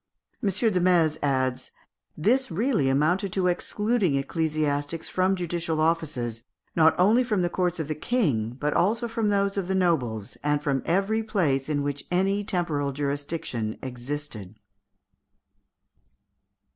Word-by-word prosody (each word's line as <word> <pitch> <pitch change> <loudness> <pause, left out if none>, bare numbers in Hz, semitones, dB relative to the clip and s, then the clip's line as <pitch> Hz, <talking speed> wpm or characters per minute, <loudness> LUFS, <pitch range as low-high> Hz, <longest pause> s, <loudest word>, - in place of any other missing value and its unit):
M. 205 - +1
Desmaze 180 -6 +2
adds, 130 -2 0 0.5
"This 250 +12 +2
really 205 - +1
amounted 170 +8 +1
to 190 -2 +1
excluding 200 - +1
ecclesiastics 150 +1 -1
from 185 +1 +2
judicial 170 -2 -2
offices, 155 -8 0 0.3
not 160 -1 +5
only 215 +7 +5
from 210 -7 0
the 175 - 0
courts 180 -2 0
of 160 - -2
the 155 - -1
King, 145 - 0
but 150 0 0
also 230 +6 +1
from 225 -2 -1
those 200 0 +1
of 190 -3 -1
the 190 - 0
nobles, 125 - 0
and 145 0 +2
from 135 -2 0
every 195 +6 +1
place 160 -11 0
in 145 -2 0
which 145 0 -3
any 195 +3 +1
temporal 165 -8 -1
jurisdiction 140 -5 -3
existed." 125 -5 -6
165 Hz, 130 wpm, -26 LUFS, 140-195 Hz, 0.5 s, not